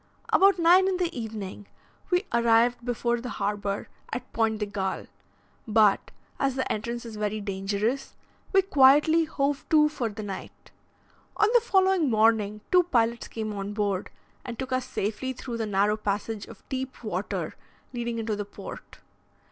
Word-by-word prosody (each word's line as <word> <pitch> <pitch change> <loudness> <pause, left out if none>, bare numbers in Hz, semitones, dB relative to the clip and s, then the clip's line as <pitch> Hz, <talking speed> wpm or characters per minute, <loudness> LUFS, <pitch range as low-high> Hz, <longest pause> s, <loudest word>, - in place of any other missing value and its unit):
About 390 0 +6
9 355 +3 +6
in 380 -1 +1
the 350 -2 -1
evening, 210 -4 -6 0.4
we 360 +2 +2
arrived 235 +1 +3
before 240 0 -1
the 250 - -5
harbour 200 -1 -2 0.2
at 250 +2 -6
Pointe 225 -1 +1
de 210 - -1
Galle, 195 -2 -3 0.6
but, 215 -2 +3 0.3
as 270 -2 +1
the 260 - -2
entrance 235 +3 -3
is 225 -2 -8
very 210 0 -1
dangerous, 205 +6 -2 0.4
we 385 -1 +5
quietly 300 +1 +5
hove 285 -1 -1
to 300 -1 +5
for 255 -6 -2
the 215 +1 -7
night. 195 -2 -8 0.7
On 430 - +4
the 480 - +6
following 380 - +3
morning 215 -2 +2
two 360 -1 +7
pilots 235 -8 0
came 215 -2 -4
on 200 0 -4
board 205 -2 -1 0.3
and 240 -2 -6
took 265 0 -5
us 255 0 0
safely 220 +6 -3
through 240 -1 -6
the 225 -1 -2
narrow 205 +1 +2
passage 210 0 -3
of - - -14
deep 260 -1 -5
water 200 -2 -3 0.4
leading 235 -1 -3
into 220 -1 -2
the 205 - -3
port. 205 - -10
230 Hz, 160 wpm, -27 LUFS, 210-270 Hz, 0.7 s, two